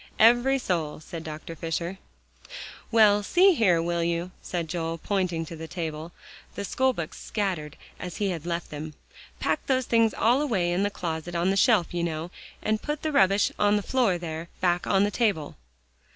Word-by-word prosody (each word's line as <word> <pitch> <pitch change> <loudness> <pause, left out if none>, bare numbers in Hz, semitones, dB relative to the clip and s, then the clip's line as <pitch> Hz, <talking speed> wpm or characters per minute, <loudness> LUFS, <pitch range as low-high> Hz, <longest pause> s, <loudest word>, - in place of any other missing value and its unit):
"Every 240 +4 +5
soul," 170 - -2
said 165 +1 -8
Dr. 155 +1 -7
Fisher. 170 +3 -3 0.9
"Well, 215 -2 +5
see 365 - +5
here, 185 - +3
will 170 0 0
you," 170 +1 -1
said 170 -2 -3
Joel, 165 0 -3
pointing 180 -3 -1
to 165 - -8
the 160 0 -7
table, 160 -1 -5 0.4
the 200 - -4
schoolbooks 255 -10 -1
scattered 185 -8 -3 0.2
as 180 -2 -6
he 205 -2 0
had 170 -1 -5
left 170 -1 -3
them, 150 +1 -6 0.4
"pack - - 0
those 260 -1 +2
things 230 -1 +3
all 245 +5 +3
away 195 -12 +1
in 175 +2 +1
the 205 - +2
closet 170 -2 -4
on 175 +3 +2
the - - +1
shelf, 195 -4 +3
you 175 -1 -1
know, 165 +1 -3 0.3
and 215 0 0
put 295 0 -4
the 310 - 0
rubbish 195 -6 +4
on 205 0 +4
the 205 - 0
floor 235 -8 +2
there, 165 0 -6
back 175 -1 +1
on 195 -1 +3
the 205 - +1
table?" 200 -10 0
180 Hz, 180 wpm, -26 LUFS, 165-215 Hz, 0.9 s, Every